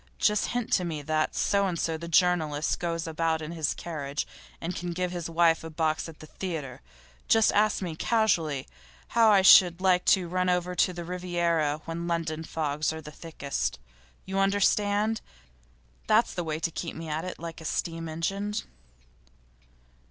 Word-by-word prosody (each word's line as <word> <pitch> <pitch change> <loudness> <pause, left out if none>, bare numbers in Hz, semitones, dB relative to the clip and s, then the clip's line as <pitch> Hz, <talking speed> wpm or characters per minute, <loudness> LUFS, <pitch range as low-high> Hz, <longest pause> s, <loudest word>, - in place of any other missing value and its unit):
Just 210 -1 +2
hint 245 -2 -2
to 180 - +3
me 160 -4 -4
that 155 +1 0
So 200 -1 +2
and 175 -2 -2
so, 165 - 0
the 170 +1 -7
journalist, 160 -3 +2
goes 170 -1 -2
about 160 0 0
in 155 +1 -6
his 160 -3 -1
carriage, 145 -4 -4 0.3
and 170 +2 -4
can 175 0 -4
give 180 +1 -2
his 175 -2 -4
wife 165 -1 +3
a 160 - -6
box 160 0 -1
at 160 - -13
the - - -9
theatre. 155 -7 -6 0.5
Just 225 -1 +5
ask 210 -1 +2
me, 170 -3 -4
casually, 165 - +1 0.4
how 230 -1 +5
I 200 -2 +5
should 180 -2 +8
like 185 -1 +3
to 185 -3 +4
run 180 +1 0
over 180 0 0
to 180 - +2
the 175 -1 -7
Riviera 170 -4 -1
when 170 +1 -4
London 165 -2 -2
fogs 150 -2 -1
are 160 - -6
thickest. 150 - -4 0.5
You 190 +1 -2
understand? 205 +2 +2 0.9
That's - - +3
the 175 - -3
way 155 -1 -3
to 165 - 0
keep 165 +1 -5
me 165 0 -7
at 155 +1 -2
it 185 - -6
like 165 0 -8
a - - -10
steam 165 +1 -2
engine. 195 +6 -2
170 Hz, 175 wpm, -27 LUFS, 160-185 Hz, 0.9 s, should